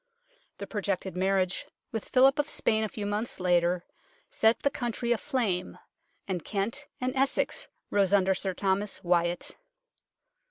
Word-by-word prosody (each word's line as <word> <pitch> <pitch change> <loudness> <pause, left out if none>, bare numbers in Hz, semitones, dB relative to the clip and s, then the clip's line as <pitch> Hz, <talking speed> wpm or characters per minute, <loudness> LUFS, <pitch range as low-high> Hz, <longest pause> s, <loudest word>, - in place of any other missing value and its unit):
The - - -5
projected 195 -3 -2
marriage 185 0 +1 0.2
with 225 -3 -4
Philip 270 +2 +5
of 295 +1 +1
Spain 220 0 +1
a 215 - -1
few 205 0 -5
months 210 +2 -2
later 175 -1 +2 0.5
set 225 +1 +3
the 280 - +3
country 240 -1 -2
aflame, 220 -6 0 0.5
and 180 -4 -2
Kent 205 +2 -2
and 255 +1 -1
Essex 270 +1 +1 0.2
rose 195 -2 +3
under 190 -1 +4
Sir 190 0 -2
Thomas 195 +1 -1
Wyatt. 175 0 +1
200 Hz, 135 wpm, -29 LUFS, 185-230 Hz, 0.5 s, Philip